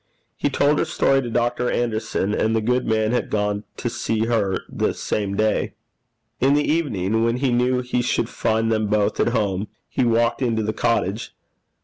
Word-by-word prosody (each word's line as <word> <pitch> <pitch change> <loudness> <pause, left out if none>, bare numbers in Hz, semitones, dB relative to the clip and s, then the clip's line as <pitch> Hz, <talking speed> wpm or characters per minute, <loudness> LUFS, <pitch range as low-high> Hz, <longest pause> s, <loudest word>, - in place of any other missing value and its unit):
He - - 0
told 145 +2 +2
her - - +2
story 135 0 +2
to 120 - -5
Dr. 120 +1 0
Anderson, 110 -3 -1
and 110 +1 +1
the - - +3
good 125 +3 0
man 110 0 +1
had 125 - -1
gone 105 0 -1
to - - -3
see 115 -1 -1
her 105 -5 0
the - - -1
same 100 -2 -2
day. 110 +1 0 0.6
In 135 +3 +4
the 150 - +1
evening, 115 - 0
when 115 +1 +1
he 130 0 +1
knew 125 +1 +2
he 125 0 -1
should 120 -1 0
find 115 -1 0
them 110 -1 +1
both 105 0 +1
at - - +3
home, 105 -4 -1 0.2
he - - -1
walked 115 +1 +2
into 115 -3 +1
the 110 +1 -1
cottage. 110 -2 -1
115 Hz, 190 wpm, -22 LUFS, 110-125 Hz, 0.6 s, In